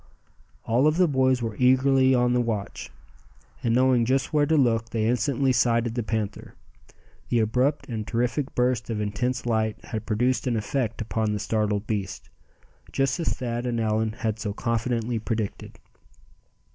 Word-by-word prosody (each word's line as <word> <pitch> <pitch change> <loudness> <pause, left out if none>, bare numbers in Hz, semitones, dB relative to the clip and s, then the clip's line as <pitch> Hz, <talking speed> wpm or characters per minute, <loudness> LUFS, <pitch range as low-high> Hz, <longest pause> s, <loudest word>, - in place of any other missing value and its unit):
All 125 +6 +3
of 155 +2 +2
the 180 -1 +4
boys 130 -3 +2
were 110 -2 -3
eagerly 130 +1 +4
on 125 0 +2
the 125 - +2
watch; 110 -4 -4 0.7
and 115 -1 +1
knowing 130 -1 +4
just 130 +5 0
where 145 -1 +3
to 160 - +3
look 115 -4 +2
they 110 -2 -1
instantly 125 +3 +1
sighted 120 -2 +2
the 120 - -1
panther. 110 -2 -4 0.7
The 120 - +2
abrupt 125 +6 +1
and 110 -4 -4
terrific 120 +4 -1
burst 125 -3 0
of 110 -2 -2
intense 120 +5 -2
light 110 -2 0
had 110 -1 -5
produced 125 +3 0
an 120 - +1
effect 115 +1 -2
upon 110 -1 -1
the 105 - -2
startled 105 -1 -1
beast, 100 -3 -4 0.6
just 135 +5 0
as 165 - 0
Thad 120 -1 -3
and 120 -1 -1
Allan 110 0 0
had 110 -1 -3
so 105 -3 -3
confidently 115 +1 -1
predicted. 110 -2 -4
120 Hz, 160 wpm, -25 LUFS, 110-130 Hz, 0.7 s, the